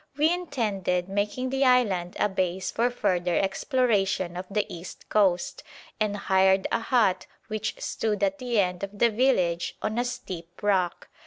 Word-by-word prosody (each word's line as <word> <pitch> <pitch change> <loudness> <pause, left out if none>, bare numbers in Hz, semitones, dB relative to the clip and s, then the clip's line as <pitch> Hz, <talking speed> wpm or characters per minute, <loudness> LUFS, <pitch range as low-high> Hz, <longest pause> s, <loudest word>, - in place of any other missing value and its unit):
We 310 +3 +4
intended 200 - -1
making 205 +6 -2
the 270 +1 +1
island 210 -9 +2
a - - +3
base 185 -1 -2
for 235 +2 +1
further 180 -7 0
exploration 195 - +1
of 180 +1 -5
the 205 +1 0
east 175 +1 -9
coast, 190 -4 +2 0.4
and 210 -1 0
hired 190 -1 +3
a - - +2
hut 225 -6 +1 0.2
which 215 0 -3
stood 210 -2 -2
at 195 0 +1
the 245 -3 0
end 180 -2 0
of 200 +1 -5
the 235 +2 +4
village 210 -8 +1
on 220 +2 -2
a - - +2
steep 175 -8 -7
rock. 190 -4 +1
200 Hz, 160 wpm, -26 LUFS, 185-235 Hz, 0.4 s, We